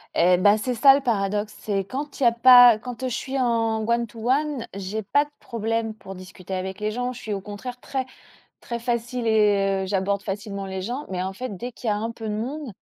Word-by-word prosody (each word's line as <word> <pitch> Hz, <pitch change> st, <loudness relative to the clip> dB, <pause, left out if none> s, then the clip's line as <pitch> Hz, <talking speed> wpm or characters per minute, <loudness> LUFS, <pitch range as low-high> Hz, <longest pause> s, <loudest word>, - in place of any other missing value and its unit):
Eh 180 Hz, +2 st, +5 dB
bah, 205 Hz, +3 st, +5 dB
c'est 250 Hz, +4 st, -2 dB
ça 270 Hz, +4 st, +7 dB
le 275 Hz, -, +2 dB
paradoxe, 210 Hz, -4 st, -1 dB
c'est 195 Hz, -2 st, -2 dB
quand 280 Hz, +7 st, -6 dB
il -, -, 0 dB
y -, -, +4 dB
a 235 Hz, -, +5 dB
pas 245 Hz, -1 st, +8 dB
quand 245 Hz, +2 st, -8 dB
je 250 Hz, -, -2 dB
suis 270 Hz, 0 st, -3 dB
en 225 Hz, -3 st, +1 dB
one 235 Hz, 0 st, +1 dB
to 225 Hz, +1 st, -6 dB
one, 285 Hz, -2 st, 0 dB
j'ai 200 Hz, +3 st, -4 dB
pas 285 Hz, +9 st, +2 dB
de 295 Hz, -, -15 dB
problème 225 Hz, -1 st, -2 dB
pour 195 Hz, -3 st, -10 dB
discuter 185 Hz, 0 st, -10 dB
avec 190 Hz, +2 st, -4 dB
les 210 Hz, 0 st, 0 dB
gens, 245 Hz, +2 st, -2 dB
je 245 Hz, -, -10 dB
suis 220 Hz, -, -6 dB
au 200 Hz, -, -2 dB
contraire 210 Hz, +5 st, -8 dB
très 265 Hz, 0 st, -3 dB, 0.6 s
très 235 Hz, -1 st, -5 dB
facile 240 Hz, +1 st, -2 dB
et 200 Hz, -3 st, +2 dB
j'aborde 200 Hz, +1 st, 0 dB
facilement 200 Hz, 0 st, -5 dB
les 190 Hz, 0 st, -5 dB
gens. 245 Hz, +9 st, -4 dB
Mais 185 Hz, -1 st, -2 dB
en 190 Hz, -, -3 dB
fait 245 Hz, 0 st, -6 dB
dès 245 Hz, +7 st, -6 dB
qu'il 240 Hz, -, -8 dB
y -, -, +3 dB
a -, -, +1 dB
un 225 Hz, +2 st, -3 dB
peu 225 Hz, -1 st, -7 dB
de 210 Hz, -, -2 dB
monde, 255 Hz, +3 st, -4 dB
225 Hz, 240 wpm, -24 LUFS, 200-245 Hz, 0.6 s, pas